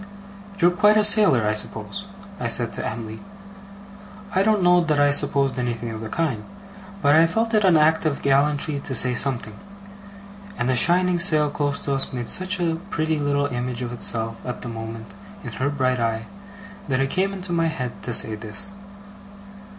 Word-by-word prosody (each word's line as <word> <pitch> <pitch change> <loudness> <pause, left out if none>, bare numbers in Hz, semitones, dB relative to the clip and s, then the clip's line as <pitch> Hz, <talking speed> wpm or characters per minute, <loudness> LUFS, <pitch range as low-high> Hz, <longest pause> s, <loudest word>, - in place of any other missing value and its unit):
'You're 175 -1 +4
quite 210 +3 +4
a 215 - +4
sailor, 205 - +5
I 105 - +1
suppose?' 110 - -4 0.3
I 120 - -2
said 115 0 +1
to - - -5
Em'ly. 110 0 -6 1.1
I 190 - +2
don't 210 -1 +2
know 175 0 +5
that 155 -3 0
I 145 0 +4
supposed 140 -1 +1
anything 120 -1 -3
of 110 -1 -7
the 110 - -6
kind, 135 -7 -2 0.6
but 145 0 +4
I 165 +2 +5
felt 225 +7 -1
it 215 -1 +3
an 180 -4 +5
act 155 +1 +3
of 145 - -3
gallantry 145 +1 +1
to 135 - -4
say 125 +1 +2
something; 125 -4 -1 1.0
and 125 +1 0
a - - +1
shining 180 +5 +3
sail 155 -5 +1
close 145 -1 -2
to 140 - -2
us 135 -1 -3
made 120 -2 -4
such 185 +1 +1
a 165 -2 0
pretty 160 -4 -1
little 145 0 0
image 125 -2 -4
of 120 0 -5
itself, 115 -1 +1
at 125 - -6
the 120 - -6
moment, 115 -1 -8 0.3
in - - -6
her 135 +2 -2
bright 130 -3 0
eye, 115 -1 -2 0.6
that 130 -3 0
it 135 0 0
came 190 +1 0
into 185 -2 -5
my 165 -1 +1
head 130 -7 -5
to 125 - -5
say 110 -1 +4
this. 105 - -7
140 Hz, 190 wpm, -22 LUFS, 120-170 Hz, 1.1 s, sailor